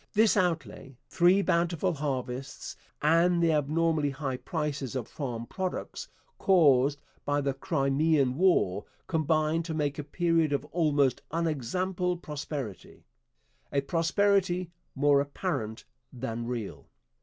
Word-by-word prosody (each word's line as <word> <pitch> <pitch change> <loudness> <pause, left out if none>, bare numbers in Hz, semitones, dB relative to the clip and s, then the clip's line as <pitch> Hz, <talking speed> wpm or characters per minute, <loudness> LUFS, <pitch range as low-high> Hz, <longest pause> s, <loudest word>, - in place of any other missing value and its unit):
This 215 +1 +4
outlay, 160 - -2
three 185 +3 +4
bountiful 170 +1 +1
harvests, 135 -2 -4 0.3
and 170 +3 +4
the 165 -1 +3
abnormally 155 0 +1
high 135 -1 -3
prices 145 -4 -3
of 120 -3 -3
farm 120 -5 -5
products 185 +6 -4 0.3
caused 145 -6 +4 0.2
by 145 0 0
the 140 -1 0
Crimean 140 -1 +1
War, 145 - +2 0.2
combined 155 0 +1
to 160 -2 -4
make 145 -1 -1
a - - -3
period 165 0 +1
of 140 - -1
almost 145 -6 +2
unexampled 175 +4 -1
prosperity 140 - -6 0.7
a 140 - +1
prosperity 180 +3 +1 0.2
more 140 0 +4
apparent 140 - -4 0.3
than 120 -2 -5
real. 120 -4 -5
150 Hz, 115 wpm, -28 LUFS, 135-170 Hz, 0.7 s, This